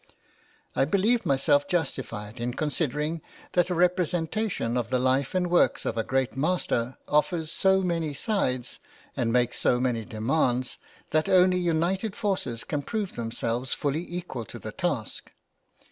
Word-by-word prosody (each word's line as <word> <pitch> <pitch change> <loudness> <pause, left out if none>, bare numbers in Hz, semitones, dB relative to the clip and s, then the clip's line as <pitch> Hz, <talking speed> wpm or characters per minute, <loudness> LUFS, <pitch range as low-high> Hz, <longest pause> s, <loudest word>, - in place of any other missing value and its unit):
I - - +3
believed 205 - +2
myself 145 +1 +3
justified 130 -9 -3
in 120 +1 -2
considering 150 +1 -1 0.3
that 175 0 +2
a 180 - 0
representation 175 - 0
of 120 -2 -1
the 130 - +2
life 130 +4 +1
and 180 -1 +2
works 175 0 +3
of 115 - -1
a 115 - 0
great 130 0 0
master 135 -5 0
offers 155 +2 +1
so 190 +1 +3
many 165 -4 0
sides, 130 - -1 0.4
and 115 -2 0
makes 125 0 +1
so 125 - +3
many 125 -3 0
demands, 125 +3 0 0.3
that 155 +1 +2
only 185 0 +5
united 180 +5 0
forces 185 - -2
can 145 -2 -2
prove 210 +5 -3
themselves 115 +2 -2
fully 150 +3 -1
equal 175 -9 -4
to - - -8
the - - -7
task. - - -3
150 Hz, 145 wpm, -27 LUFS, 125-180 Hz, 0.4 s, only